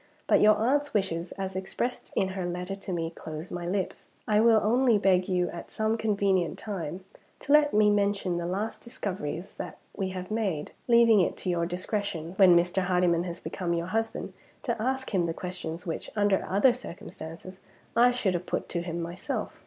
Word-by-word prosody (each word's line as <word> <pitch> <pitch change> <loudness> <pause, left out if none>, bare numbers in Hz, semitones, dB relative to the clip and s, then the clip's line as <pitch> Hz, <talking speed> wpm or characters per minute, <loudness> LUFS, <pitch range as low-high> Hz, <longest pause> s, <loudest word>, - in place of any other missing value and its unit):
But - - +4
your 215 0 +7
aunt's 280 +6 +1
wishes, 180 -4 -1
as 190 -1 -5
expressed 235 +6 -3
in 190 - +2
her 190 -1 -4
letter 180 +2 -3
to 195 -1 -6
me, 165 -2 -2
close 160 0 -7
my 175 -1 -4
lips. 190 +1 -3 0.2
I 210 -1 +4
will 225 0 +6
only 240 +1 +4
beg 185 -2 +3
you, 180 -2 +1
at 170 - -8
some 220 +1 0
convenient 200 -5 +1
time, 185 -3 -5 0.4
to 285 - +1
let 300 -1 +6
me 210 0 +5
mention 200 -3 +1
the 170 0 -2
last 200 +5 -3
discoveries 185 - -5
that - - -6 0.2
we 195 -2 -2
have 185 0 -6
made; 195 -9 -1 0.2
leaving 235 -3 +6
it 175 - 0
to 185 - -2
your 170 -1 0
discretion, 180 -2 -3
when 185 -3 +7
Mr. 175 +2 +1
Hardyman 180 -2 +2
has 170 -1 -5
become 170 +2 -2
your 170 0 -1
husband, 225 0 -2 0.3
to 235 -4 -2
ask 260 0 -2
him 190 - +3
the 165 -1 -1
questions 180 -1 -5
which, 165 - -4
under 205 -2 +2
other 205 +7 +5
circumstances, 180 -4 -9 0.4
I 245 +1 +6
should 230 -6 0
have 175 0 -3
put - - -2
to 170 - -1
him 170 0 -4
myself. 175 +3 -4
190 Hz, 190 wpm, -28 LUFS, 175-215 Hz, 0.4 s, your